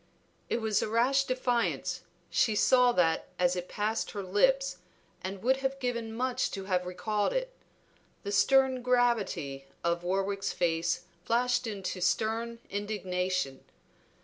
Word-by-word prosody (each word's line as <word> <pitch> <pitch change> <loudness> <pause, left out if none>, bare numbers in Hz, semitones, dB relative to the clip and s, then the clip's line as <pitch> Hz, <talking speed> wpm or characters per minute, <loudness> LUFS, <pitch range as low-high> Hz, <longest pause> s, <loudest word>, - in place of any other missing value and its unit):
It 235 - 0
was 220 -2 +1
a - - -2
rash 255 +5 +3
defiance; 250 -2 0 0.3
she 220 -3 +2
saw 250 +3 +5
that 165 -4 +2
as 180 0 +2
it 180 0 -5
passed 215 +2 -1
her 200 -2 -4
lips, 265 +5 +2 0.5
and 190 +1 -5
would 260 +2 +3
have 270 0 -2
given 240 -4 -2
much 250 +2 -1
to 195 - -4
have 180 -2 0
recalled 200 +3 -1
it. - - -2 0.7
The 200 - -3
stern 260 +5 +4
gravity 235 - +1 0.2
of 170 0 0
Warwick's 195 +2 -1
face 170 0 0 0.2
flashed 245 +2 +1
into 195 -3 -4
a - - -9
stern 225 +5 0
indignation. 185 -7 -2
215 Hz, 140 wpm, -30 LUFS, 185-245 Hz, 0.7 s, saw